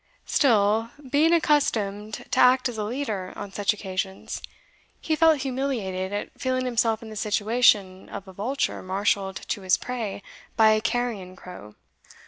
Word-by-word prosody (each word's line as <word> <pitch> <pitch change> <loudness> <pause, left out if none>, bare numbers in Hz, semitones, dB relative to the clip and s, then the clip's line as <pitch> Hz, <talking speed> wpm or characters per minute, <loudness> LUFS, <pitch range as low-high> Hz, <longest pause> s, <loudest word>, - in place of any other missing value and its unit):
Still, 225 -3 +3 0.2
being 310 +3 +4
accustomed 220 -11 +1
to - - +1
act 255 +1 +5
as 235 -3 -6
a - - -1
leader 215 -5 -3
on 205 -1 -7
such 205 0 +1
occasions, 190 -2 -4 0.6
he 315 - 0
felt 315 -2 +4
humiliated 245 -9 -2
at 205 0 -4
feeling 255 0 0
himself 230 -2 +1
in 220 - -9
the - - -8
situation 210 -2 +2
of 200 -1 -8
a 190 - -11
vulture 245 +9 -2
marshalled 190 0 -1
to 205 - -2
his 185 -1 +3
prey 225 -5 -5 0.3
by 220 -1 +6
a 215 0 +2
carrion 225 -7 -2
crow. 140 - -11
215 Hz, 150 wpm, -25 LUFS, 195-250 Hz, 0.6 s, by